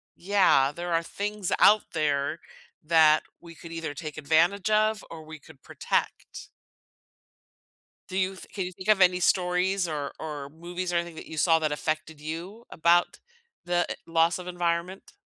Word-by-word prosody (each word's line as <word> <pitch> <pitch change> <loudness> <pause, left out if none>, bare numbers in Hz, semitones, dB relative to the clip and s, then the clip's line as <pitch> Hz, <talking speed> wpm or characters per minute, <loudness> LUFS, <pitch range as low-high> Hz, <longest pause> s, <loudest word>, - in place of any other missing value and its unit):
yeah, 185 -8 +3
there 175 +1 -4
are 165 - +1
things 205 +1 -4
out 210 0 +6
there 150 0 0 0.5
that 155 -1 +5 0.2
we 170 -1 -13
could 165 - -12
either 165 -3 -5
take 155 0 -7
advantage 170 +7 +2
of 215 0 +2
or 160 -1 -9
we 155 0 -11
could 145 -2 -18
protect. - - -3 1.6
Do 185 - -6
you 190 0 0
th - - -12
can 195 - -3
you 180 - -6
think 185 +2 -10
of 215 -2 +5
any 180 -1 +5
stories 180 +1 +1
or 145 -3 -4
or 150 -3 -6
movies 175 +3 -5
or - - +1
anything 170 -1 -3
that - - -9
you 160 - -9
saw 165 +1 +4
that 155 -2 -1
affected 155 0 -3
you 170 +9 -7
about 170 +1 +2 0.5
the 175 0 +1
eh - - -2
loss 165 +1 +2
of 180 - -9
environment? 175 +1 -3
170 Hz, 170 wpm, -27 LUFS, 155-185 Hz, 1.6 s, out